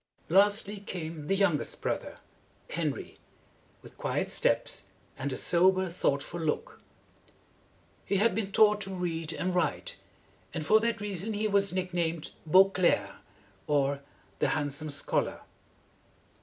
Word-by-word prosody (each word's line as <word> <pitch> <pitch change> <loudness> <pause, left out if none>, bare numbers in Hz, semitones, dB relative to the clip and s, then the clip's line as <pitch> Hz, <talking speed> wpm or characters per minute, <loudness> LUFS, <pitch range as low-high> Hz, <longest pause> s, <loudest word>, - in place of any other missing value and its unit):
Lastly 205 +3 +4
came 165 -6 -6
the 195 - +2
youngest 190 -6 +1
brother, - - -3 0.5
Henry, - - -3 0.6
with - - -15
quiet - - -1
steps - - 0 0.3
and 140 +1 -3
a 130 - -3
sober, 185 +1 +3
thought 140 -5 0
ful 175 - -7
look. 160 -2 -3 1.2
He - - -1
had 220 +2 +3
been 200 -1 -2
taught 210 0 +5
to 195 -1 -4
read 165 -3 -3
and 180 +3 -2
write, - - -1 0.6
and 155 -2 -3
for 215 +5 +6
that 230 -1 -1
reason 205 +1 -1
he 215 +1 0
was 200 -1 +2
nick 185 0 -2
named 165 -2 -2 0.2
Beau 190 +4 +6
clerc, 135 - +1 0.5
or 140 -1 +1 0.4
the - - +2
Hand 145 -2 -1
some 155 +2 -6
Schol 140 - 0
ar. - - -13
180 Hz, 140 wpm, -29 LUFS, 155-200 Hz, 1.2 s, for